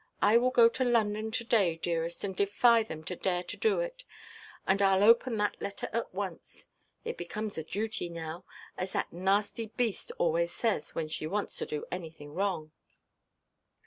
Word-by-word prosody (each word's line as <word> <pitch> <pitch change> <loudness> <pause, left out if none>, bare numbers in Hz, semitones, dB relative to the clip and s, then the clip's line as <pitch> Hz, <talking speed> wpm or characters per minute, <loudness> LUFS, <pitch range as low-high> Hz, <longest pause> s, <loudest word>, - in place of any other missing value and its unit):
I 210 +2 +4
will 250 +1 +3
go 240 -2 +7
to 255 +3 0
London 220 -3 +1
to–day, 220 -7 +2
dearest, 165 0 -2
and 195 -2 -3
defy 225 +4 +4
them 160 -8 -6
to 180 +2 -5
dare 180 0 0
to 175 - -5
do 445 +2 +2
it. - - -5 0.6
And 190 +1 +2
Iʼll 195 0 +4
open 230 +2 +5
that 205 0 -1
letter 200 - -4
at 230 0 -2
once. 190 -2 -6 0.4
It - - -3
becomes 210 +5 -4
a - - -4
duty 205 +1 -2
now; 165 +1 -6 0.4
as 185 +1 -3
that - - -2
nasty 200 +5 0
beast 230 -1 -2
always 170 +1 +1
says, 205 -6 -1
when 160 -1 -1
she 155 0 -4
wants 205 +5 -2
to - - -3
do 150 - -4
anything 160 -4 -7
wrong." 175 -4 -1
200 Hz, 175 wpm, -30 LUFS, 170-225 Hz, 0.6 s, go